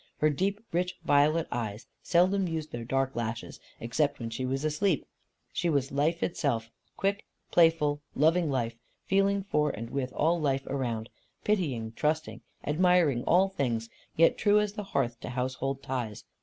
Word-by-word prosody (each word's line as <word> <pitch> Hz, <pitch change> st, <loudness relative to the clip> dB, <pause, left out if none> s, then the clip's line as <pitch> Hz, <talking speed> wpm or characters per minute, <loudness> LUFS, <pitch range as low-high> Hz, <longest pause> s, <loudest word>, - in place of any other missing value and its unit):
Her 155 Hz, 0 st, +3 dB
deep 195 Hz, +7 st, 0 dB
rich 180 Hz, +2 st, -1 dB
violet 150 Hz, +3 st, +3 dB
eyes 110 Hz, -2 st, -3 dB, 0.2 s
seldom 185 Hz, +2 st, +3 dB
used 160 Hz, -2 st, -4 dB
their 120 Hz, -1 st, -5 dB
dark 135 Hz, +2 st, 0 dB
lashes, 115 Hz, 0 st, -4 dB, 0.2 s
except 140 Hz, +5 st, 0 dB
when 115 Hz, -2 st, -5 dB
she 130 Hz, +3 st, -3 dB
was 135 Hz, +3 st, -1 dB
asleep. 155 Hz, +2 st, +1 dB, 0.5 s
She 175 Hz, -, 0 dB
was 140 Hz, -3 st, +1 dB
life 155 Hz, +5 st, +1 dB
itself, 115 Hz, -9 st, -1 dB, 0.3 s
quick, 200 Hz, +1 st, -1 dB, 0.2 s
playful, 160 Hz, -4 st, +4 dB
loving 160 Hz, +3 st, +3 dB
life, 115 Hz, -4 st, -2 dB, 0.3 s
feeling 195 Hz, +1 st, +2 dB
for 150 Hz, -6 st, +1 dB
and 115 Hz, -1 st, -6 dB
with 130 Hz, -2 st, -2 dB
all 165 Hz, +2 st, +2 dB
life 135 Hz, -2 st, 0 dB
around; 120 Hz, -5 st, -3 dB, 0.3 s
pitying, 140 Hz, -, 0 dB
trusting, 155 Hz, +6 st, -1 dB, 0.2 s
admiring 160 Hz, -5 st, +3 dB
all 185 Hz, +3 st, +5 dB
things; 120 Hz, -11 st, -2 dB, 0.3 s
yet 165 Hz, +1 st, +4 dB
true 210 Hz, 0 st, +5 dB
as 210 Hz, -1 st, -1 dB
the 210 Hz, -1 st, -5 dB
hearth 120 Hz, -9 st, -1 dB
to -, -, -6 dB
household 130 Hz, +2 st, -2 dB
ties. 120 Hz, -5 st, -4 dB
145 Hz, 155 wpm, -29 LUFS, 125-175 Hz, 0.5 s, all